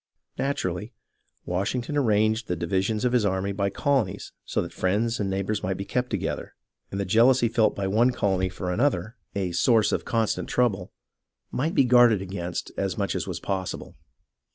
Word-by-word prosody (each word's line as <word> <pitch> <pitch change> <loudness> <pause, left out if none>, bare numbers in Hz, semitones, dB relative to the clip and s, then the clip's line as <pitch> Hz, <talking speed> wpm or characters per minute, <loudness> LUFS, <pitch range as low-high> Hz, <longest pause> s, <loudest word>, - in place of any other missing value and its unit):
Naturally, 105 -5 -2 0.5
Washington 110 +10 -2
arranged 110 -3 +2
the 90 - -1
divisions 95 +7 -1
of 125 - +1
his 120 -3 +3
army 95 0 0
by 100 0 0
colonies 130 -4 -1
so - - -1
that - - -8
friends 110 +6 0
and 100 -2 -1
neighbours 100 +2 -1
might 95 0 -2
be 100 - -5
kept 125 +3 -1
together, - - -3 0.3
and 95 - -4
the 100 - -1
jealousy 120 +5 +4
felt 115 -1 +2
by 100 - -2
one 110 +6 +3
colony 95 -6 0
for 90 -1 -4
another, 110 -1 0 0.2
a 95 -3 -1
source 110 +5 +3
of - - -1
constant 115 -2 -1
trouble, 105 -7 0 0.6
might 160 +6 -1
be 135 - +5
guarded 120 -4 +6
against 90 -2 -5
as - - -1
much - - -1
as - - -3
was - - -4
possible. 95 -2 -4
105 Hz, 175 wpm, -26 LUFS, 95-120 Hz, 0.6 s, guarded